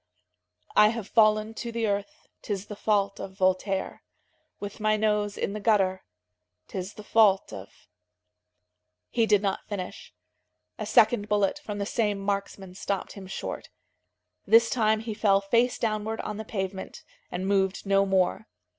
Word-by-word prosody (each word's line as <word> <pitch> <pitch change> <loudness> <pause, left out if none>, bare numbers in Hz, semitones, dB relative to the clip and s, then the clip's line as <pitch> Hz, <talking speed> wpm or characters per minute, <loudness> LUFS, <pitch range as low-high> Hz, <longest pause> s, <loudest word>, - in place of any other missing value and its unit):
" 90 0 -28
"I 210 - +7
have 225 -2 -3
fallen 215 -1 +3
to 235 +1 -5
the 230 -1 -1
earth, 205 +9 -3
'Tis 200 -2 -4
the 210 - -8
fault 200 -1 0
of 190 0 -8
Voltaire; 190 +1 0 0.6
With 205 +2 -7
my 215 0 +2
nose 210 -1 0
in 200 - -2
the 215 - -4
gutter, 195 -3 +2 0.6
'Tis 190 +2 -6
the 210 - -10
fault 205 -3 +3
of... 95 0 -11 0.6
" 90 0 -55
He 230 -1 +2
did 210 -1 +4
not 195 -1 -2
finish. 190 -3 -6 0.7
A - - -4
second 210 -4 +4
bullet 205 +6 +1
from 215 -8 -6
the 200 - -2
same 210 -1 0
marksman 195 -1 -3
stopped 195 0 -3
him 195 -2 -10
short. 190 - -6 0.8
This 230 0 +6
time 220 -3 +2
he 225 -1 -4
fell 205 -2 +3
face 235 +5 +1
downward 220 0 -2
on 210 - -5
the 220 - -6
pavement, 190 -2 -5 0.3
and 185 - -4
moved 195 -1 +1
no 195 0 +4
more. 190 - +1
205 Hz, 160 wpm, -27 LUFS, 190-215 Hz, 0.8 s, I